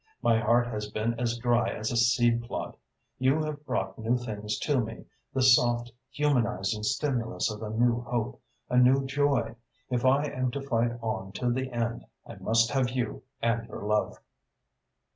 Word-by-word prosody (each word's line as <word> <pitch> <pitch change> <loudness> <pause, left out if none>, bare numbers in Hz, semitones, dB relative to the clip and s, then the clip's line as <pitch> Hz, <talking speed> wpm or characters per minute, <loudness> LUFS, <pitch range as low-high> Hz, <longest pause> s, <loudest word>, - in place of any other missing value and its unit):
My 115 -1 +4
heart 120 +2 +3
has 105 -3 -4
been 110 +2 -1
as 120 -1 0
dry 120 -1 +2
as 110 - -3
a - - -2
seed 120 0 +3
plot. 120 - -5 0.4
You 130 +4 +3
have 150 -1 -5
brought 95 +1 -2
new 115 +3 +1
things 105 -3 -4
to 145 -3 +2
me, 110 - -7 0.3
the 130 - 0
soft, 120 -1 +4 0.2
humanising 120 -8 0
stimulus 115 -1 -1
of 105 0 -7
a 110 - -4
new 120 +2 +2
hope, 120 - -3 0.3
a 125 - 0
new 130 +2 +5
joy. 135 -4 +1 0.4
If 125 -1 0
I 135 +3 +4
am 130 -3 -1
to 140 - -3
fight 120 -3 +1
on 95 -3 -3
to 120 +4 0
the 130 +1 -2
end, 120 0 -2 0.2
I - - -9
must 115 +4 +2
have 130 -2 +1
you 125 -3 -3 0.2
and 115 0 +1
your - - -8
love." 105 0 0
120 Hz, 175 wpm, -28 LUFS, 110-130 Hz, 0.4 s, new